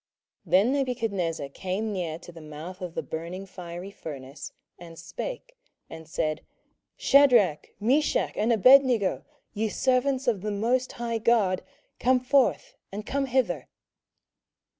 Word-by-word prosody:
27:003:026 - - -14
Then 200 +7 +5
Nebuchadnezzar 225 - -1
came 195 +8 -3
near 170 -4 -3
to 175 - -12
the 165 -1 -12
mouth 155 +5 -9
of 175 -2 -6
the - - -2
burning 170 +4 -6
fiery 180 0 -8
furnace, 140 -6 -8 0.3
and 165 -1 -11
spake, - - -7 0.4
and 160 -1 -9
said, 155 -1 -1 0.6
Shadrach, 240 - +4
Meshach, 270 +8 +1
and 220 +3 +1
Abednego, 245 -2 +5 0.3
ye 220 +1 -1
servants 260 +3 +1
of 220 -6 +1
the 210 - -3
most 235 +5 0
high 235 -1 -3
God, 210 -5 +2 0.4
come 255 +1 +3
forth, 260 +1 +2 0.2
and 210 +2 -6
come 275 0 -1
hither. 230 - 0
205 Hz, 135 wpm, -27 LUFS, 170-250 Hz, 0.6 s, Then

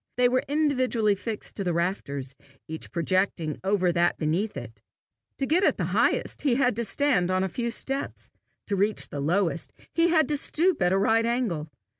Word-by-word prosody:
They 250 0 +5
were 255 +1 +2
individually 255 -7 +1
fixed 210 +2 -5
to 200 - -2
the 175 -2 -1
rafters, 140 -7 -2 0.3
each 160 0 -7
projecting 170 -2 0
over 190 -2 +2
that 175 0 +1
beneath 170 +5 -1
it. 115 -4 -9 0.6
To 270 - -1
get 335 +7 +2
at - - +3
the - - -1
highest, - - +1
he 270 -5 +2
had 250 -3 +2
to 235 - +1
stand 230 -7 +2
on 185 0 +1
a - - 0
few 235 +6 -3
steps; 270 +4 -3 0.3
to 205 - -1
reach 205 +2 0
the 145 - -5
lowest, 170 +3 0 0.2
he 335 0 +3
had 320 -4 +3
to 295 - +2
stoop 330 - +1
at 180 0 +3
a 190 - +3
right 225 +3 +2
angle. 215 -11 -1
205 Hz, 190 wpm, -26 LUFS, 175-255 Hz, 0.6 s, They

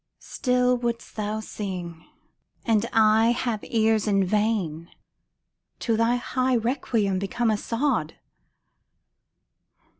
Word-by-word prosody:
Still 250 -1 +1
wouldst 235 -1 -4
thou 215 0 -3
sing, 180 -6 -6 0.6
and 225 -1 +2
I 220 +1 +4
have 235 -4 -2
ears 220 -1 +1
in 195 -2 +3
vain 200 -6 0
ŌĆö - - -35
To 230 - +1
thy 230 +2 +2
high 255 +1 0
requiem 230 -5 0
become 220 +4 0
a 215 - +1
sod. 230 - -1
220 Hz, 110 wpm, -25 LUFS, 205-240 Hz, 0.6 s, I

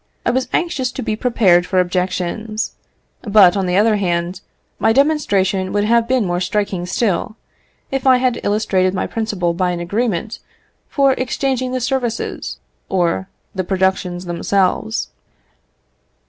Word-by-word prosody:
I - - +3
was 260 +1 0
anxious 280 -8 0
to - - -4
be 220 - -1
prepared 195 -7 +3
for 185 - +1
objections; 185 +4 -1 0.5
but, 200 -4 +5
on 195 -2 0
the 180 +1 +1
other 215 +1 +4
hand, 175 -1 -1 0.4
my 225 - +3
demonstration 200 -10 +1
would 205 - +1
have 230 +2 +3
been 255 -3 +2
more 175 -1 -1
striking 190 -1 -1
still, 205 +1 -1 0.6
if 270 0 -1
I 260 -1 +7
had 250 -1 0
illustrated 195 -3 +1
my 185 - -1
principle 205 -6 -1
by 180 +1 0
an 175 -1 -2
agreement 210 +3 -2 0.5
for 275 -2 +3
exchanging 255 0 -1
the 255 - -1
services 245 -2 -2 0.3
or 170 - 0 0.2
the 190 - -2
productions 185 -1 -1
themselves. 180 - 0
205 Hz, 140 wpm, -18 LUFS, 180-240 Hz, 0.6 s, I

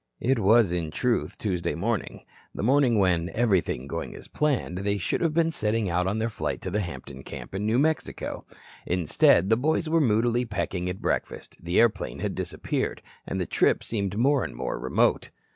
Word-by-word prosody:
It 130 0 +1
was, 110 -1 +5
in 85 -3 -1
truth, 120 +9 -1
Tuesday 90 -5 -2
morning. 105 +5 -3 0.3
The - - -4
morning 130 -1 +4
when, 90 -3 +2
everything 100 - +1
going 70 - -5
as - - -11
planned, 135 - -1
they 100 +1 0
should 95 - -1
have 165 -3 +1
been 165 -1 +3
setting 105 - 0
out 90 +2 +1
on 100 +3 0
their 110 +1 0
flight - - -3
to 95 - -4
the 105 - 0
Hampton 70 -6 -7
camp - - -9
in 100 +2 -2
New 110 +2 +2
Mexico. 155 +3 -1 0.4
Instead, 90 +2 +3
the 110 - +5
boys 155 +5 0
were 165 +1 +3
moodily 120 0 +2
pecking 95 -5 -3
at 90 - -6
breakfast, - - -2
the 85 +2 +1
airplane 110 -4 +2
had - - -2
disappeared, - - -3 0.2
and 95 - -2
the 90 - -1
trip - - +2
seemed 100 -3 -3
more 135 +3 +3
and - - -6
more - - -3
remote. 65 +1 +1
105 Hz, 190 wpm, -26 LUFS, 90-120 Hz, 0.4 s, was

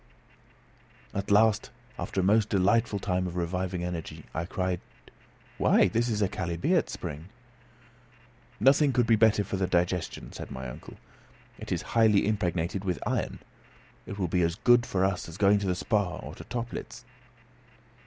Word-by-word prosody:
At 100 0 -3
last 105 +1 +4 0.3
after 95 - -2
a - - -1
most 105 +3 +3
delightful 100 +3 +2
time 90 -2 -1
of 90 - -6
reviving 90 +1 -2
energy, 85 -2 -5
I 80 - -2
cried, 90 -1 -2 0.8
"Why, - - +4
this 120 +2 0
is 105 -2 0
a - - +3
chalybeate 85 -2 0
spring!" 75 +5 -6 1.3
"Nothing 135 +4 +4
could 120 -1 +3
be 115 0 +4
better 110 -2 +4
for 95 - -3
the 95 -1 0
digestion," 90 0 -1
said - - -8
my 65 -1 -6
uncle. - - -10 0.6
"It - - -8
is - - -1
highly 110 -3 +4
impregnated 95 -2 -1
with 90 -3 -1
iron. - - -1 0.7
It 100 - -6
will 95 -3 0
be 90 +2 +1
as 85 0 +1
good 120 +3 +4
for 95 0 +1
us 95 -3 -2
as 85 - -9
going 100 0 +4
to 100 - -3
the 90 - +1
Spa, 100 -1 0
or - - -8
to - - -10
Töplitz." 120 +1 -6
95 Hz, 165 wpm, -28 LUFS, 90-110 Hz, 1.3 s, last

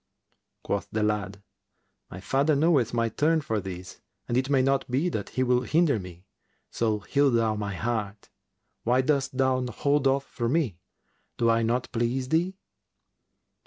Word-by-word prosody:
Quoth 100 - -2
the 110 0 0
lad, 100 -2 -2 0.7
"My 95 - -8
father 140 +9 +1
knoweth 140 -6 +3
my 115 -1 +1
turn 155 +8 +2
for 110 -8 -2
this 90 -2 -8 0.3
and 120 - -1
it 130 +2 +1
may 135 -2 +3
not 135 0 +1
be 140 +8 +1
that 105 - -4
he 130 - -1
will 125 -1 +2
hinder 150 -2 +2
me: 90 -1 -11 0.5
so 110 -2 0
heal 140 +6 +2
thou 115 -3 +2
my 105 -2 -4
heart. 105 -1 -3 0.5
Why 125 +2 +3
dost 135 -1 0
thou 130 -1 +2
hold 140 +4 +1
off 135 +1 +1
from 120 0 -2
me? 130 - 0 0.6
Do 115 -1 +3
I 115 0 +2
not 120 +2 -1
please 125 +2 -1
thee?" 175 +5 +1
125 Hz, 160 wpm, -27 LUFS, 110-140 Hz, 0.7 s, knoweth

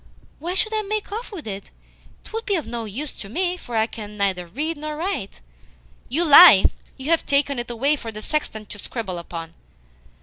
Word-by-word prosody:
"Why 345 +5 -3
should 435 +3 +2
I 435 - +1
make 425 0 -3
off 455 +4 -5
with 365 -7 -8
it? 200 -2 -6 0.5
'Twould 450 +1 -5
be 405 - +2
of 325 - -1
no 235 -1 -4
use 260 +8 -5
to 195 - -9
me, 355 - 0
for 245 -9 -8
I 220 - +4
can 210 -2 -9
neither 190 -3 0
read 300 - -2
nor 305 0 -5
write." 330 - -4 0.7
"You 320 +8 +1
lie! 295 - +10 0.3
You 270 +5 -3
have 330 - +3
taken 280 -2 +1
it 240 - -5
away 270 +6 +2
for 230 -6 -7
the 215 0 -8
sexton 220 -8 -2
to 205 0 -11
scribble 190 -5 -5
upon." 165 -1 -7
275 Hz, 200 wpm, -23 LUFS, 210-340 Hz, 0.7 s, lie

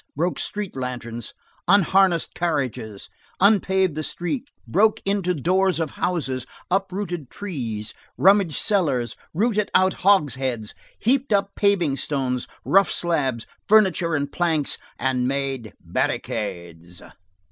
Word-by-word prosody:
broke 170 +5 -1
street 205 -2 -4
lanterns, 120 -3 -5 0.4
unharnessed 190 -2 +4
carriages, 130 - -2 0.3
unpaved 190 -3 +3
the 155 - -3
streets, 240 - -4
broke 215 +3 +3
in 200 +1 +1
the 180 0 0
doors 185 +5 +2
of 160 -3 -1
houses, 140 -8 -2 0.3
uprooted 185 -6 -2
trees, 120 - -5 0.2
rummaged 195 -5 +4
cellars, 145 - +1 0.2
rolled 215 +5 +1 0.2
out 185 0 +4
hogsheads, 130 - +1 0.2
heaped 265 +3 +1
up 200 -1 +2
paving 185 -9 +2
stones, 130 -3 -1 0.2
rough 195 0 +4
slabs, 140 -9 0 0.2
furniture 190 -6 +4
and 145 -1 -2
planks, 160 -5 0 0.2
and 130 -1 0
made 135 -5 -2
barricades. 85 -5 -4
165 Hz, 115 wpm, -23 LUFS, 130-195 Hz, 0.4 s, unharnessed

